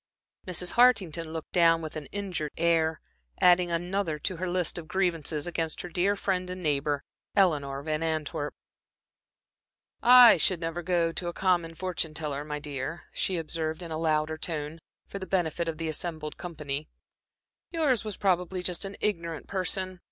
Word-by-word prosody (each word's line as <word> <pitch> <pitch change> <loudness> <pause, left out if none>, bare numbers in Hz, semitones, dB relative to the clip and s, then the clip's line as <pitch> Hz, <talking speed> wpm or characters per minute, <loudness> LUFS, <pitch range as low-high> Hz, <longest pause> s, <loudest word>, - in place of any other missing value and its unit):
Mrs. 180 0 +1
Hartington 185 -10 +3
looked 160 -1 -6
down 165 -1 +5
with 160 -1 -7
an 155 -2 -6
injured 185 -7 -3
air, 160 -1 +2 0.4
adding 180 0 +5
another 175 -1 -1
to 170 +4 -3
her 185 +1 -2
list 180 -1 0
of 160 - -10
grievances 165 -5 0
against 165 -2 -2
her 180 - -7
dear 185 +4 +1
friend 185 -2 -1
and 180 0 -5
neighbor, 145 -3 0 0.3
Eleanor 140 -7 +2
Van 155 0 -1
Antwerp. 155 -2 -2 1.5
"I 245 -3 +9
should 175 +2 +2
never 165 +1 -3
go 170 -1 +1
to 175 +1 -4
a 175 - -3
common 175 -3 +1
fortune 170 -3 -3
teller, 145 -2 -3
my 150 0 -4
dear," 145 +2 -5
she 185 - -1
observed 160 +1 -3
in 165 - -7
a 155 - -2
louder 155 -1 0
tone, 155 -1 -2 0.3
for 200 - -7
the 190 - -6
benefit 170 -2 0
of 165 -1 -3
the 165 0 -3
assembled 155 -1 -3
company. 150 -3 -5 0.8
"Yours 295 -9 +1
was 215 -3 -5
probably 180 -1 0
just 180 0 -1
an 195 0 -6
ignorant 170 -6 -2
person. 185 -1 -1
170 Hz, 165 wpm, -28 LUFS, 155-185 Hz, 1.5 s, I